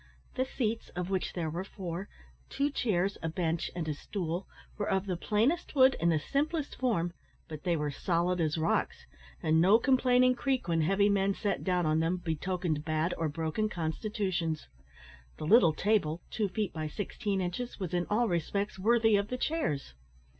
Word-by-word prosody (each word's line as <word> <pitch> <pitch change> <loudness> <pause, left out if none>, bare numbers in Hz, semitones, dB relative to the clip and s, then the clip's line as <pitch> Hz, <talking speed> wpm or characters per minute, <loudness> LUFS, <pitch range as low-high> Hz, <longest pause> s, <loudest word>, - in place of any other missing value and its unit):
The 260 - 0
seats, 230 -4 -2
of 180 +1 -3
which 190 -1 -1
there 165 -3 -2
were 175 +4 -3
four 190 -1 -6 0.4
two 285 +1 0
chairs, 200 -7 0
a 165 - -2
bench, 165 -1 -1
and 170 -3 -3
a 155 - 0
stool 175 +3 -4 0.3
were 205 - -2
of 190 0 +1
the 185 -2 -1
plainest 225 - 0
wood, 260 -1 +6
and 170 0 +3
the 160 - +3
simplest 290 - -1
form; 175 -10 0 0.3
but 155 -2 -7
they 175 -2 +2
were 150 -1 -1
solid 175 +4 0
as 155 0 0
rocks, 160 +1 0 0.4
and 160 +1 +4
no 195 +5 +7
complaining 255 0 +4
creak, 260 -1 -1
when 165 -1 +2
heavy 195 +5 +3
men 200 -1 +2
sat 205 - -2
down 180 -2 +1
on 155 +1 +2
them, 165 +3 +1
betokened 175 -2 -2
bad 155 +2 0
or 160 -1 -1
broken 165 +7 -1
constitutions. 175 -1 -2 0.7
The - - -5
little 175 -2 +6
table 170 -2 0
two 210 -3 0
feet 210 +1 -2
by 155 -1 -3
sixteen 205 +3 -3
inches 185 +8 -3
was 185 -4 -4
in 175 0 0
all 230 +3 +2
respects 195 +3 -1
worthy 225 +1 +4
of 200 0 -1
the 250 - -3
chairs. 250 - -1
185 Hz, 180 wpm, -30 LUFS, 165-215 Hz, 0.7 s, no